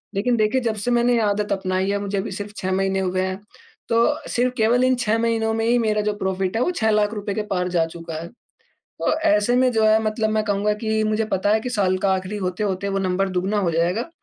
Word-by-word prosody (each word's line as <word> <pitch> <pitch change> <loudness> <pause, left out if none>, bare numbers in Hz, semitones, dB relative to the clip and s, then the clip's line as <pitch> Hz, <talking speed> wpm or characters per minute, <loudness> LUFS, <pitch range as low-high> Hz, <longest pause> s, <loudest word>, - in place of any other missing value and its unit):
लेकिन 240 +5 +1
देखिए 215 +4 +2
जब 230 -3 -1
से 215 +4 -2
मैंने 240 0 +3
ये 235 - +3
आदत 205 0 0
अपनाई 190 0 -1
है 200 - 0
मुझे 200 0 -3
अभी 195 - -3
सिर्फ 205 +2 -6
6 190 0 -2
महीने 195 0 0
हुए 185 0 0
हैं 190 +1 -3 0.5
तो 230 - +3 0.3
सिर्फ 250 +1 +1
केवल 235 +3 +3
इन 255 0 +3
6 225 -3 0
महीनों 225 -1 0
में 225 0 -1
ही 240 +1 +3
मेरा 215 -2 +1
जो 210 0 -1
प्रॉफिट 190 +1 -1
है - - 0
वो 360 - 0
6 220 -9 +1
लाख़ 210 0 +2
रुपये 205 -1 -4
के 215 - 0
पार 180 0 0
जा 170 -2 +2
चुका 165 0 -8
है, 165 - -7 0.5
तो - - -3
ऐसे 210 -4 +2
में 255 0 +3
जो 220 -2 +2
है 215 +1 +4
मतलब 215 0 0
मैं 215 0 +1
कहूँगा 205 0 +1
कि 220 0 +1
मुझे 215 +1 0
पता 195 +2 +1
है 220 - +3
कि 250 - -4
साल 195 -5 +1
का 190 - +3
आखिरी 190 +2 -3
होते-होते 190 +1 -2
वो 195 0 -1
नंबर 190 0 0
दुगुना 185 +3 -1
हो 180 -4 0
जाएगा। 175 - 0
210 Hz, 250 wpm, -22 LUFS, 190-220 Hz, 0.5 s, है